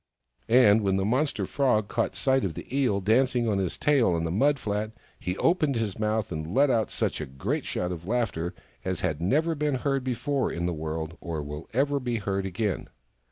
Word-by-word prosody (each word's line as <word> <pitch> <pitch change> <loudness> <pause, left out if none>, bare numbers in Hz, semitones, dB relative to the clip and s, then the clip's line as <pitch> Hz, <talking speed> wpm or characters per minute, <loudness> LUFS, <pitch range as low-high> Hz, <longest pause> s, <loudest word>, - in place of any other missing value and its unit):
And 110 -3 +6
when 95 -2 +1
the 95 - 0
monster 130 +7 +1
Frog 115 -7 +1
caught - - -1
sight 135 -1 +2
of 85 -5 -2
the - - -7
Eel 120 -8 +2
dancing 120 +3 +2
on 100 -3 +1
his 95 -3 -2
tail 135 -11 +3
on 85 -1 0
the 80 - -1
mud 140 +10 +3
flat, 105 -2 -3 0.3
he 90 +1 -3
opened 160 -5 +2
his 110 -3 -2
mouth 110 0 0
and 80 +2 -4
let 140 0 +5
out 115 -3 +1
such - - -2
a - - -4
great 70 +1 -3
shout 90 0 -2
of 85 0 -6
laughter 95 -8 -1 0.3
as 95 -2 -2
had 80 -4 -1
never 155 - +2
been 150 -2 0
heard 135 +1 0
before 130 +2 -1
in 85 - -2
the 90 - 0
world 80 +1 -4
or 80 -4 -4
will 75 +2 -7
ever 140 +4 +1
be 125 -2 -2
heard 100 -3 -1
again. 100 +1 -2
110 Hz, 205 wpm, -27 LUFS, 90-130 Hz, 0.3 s, And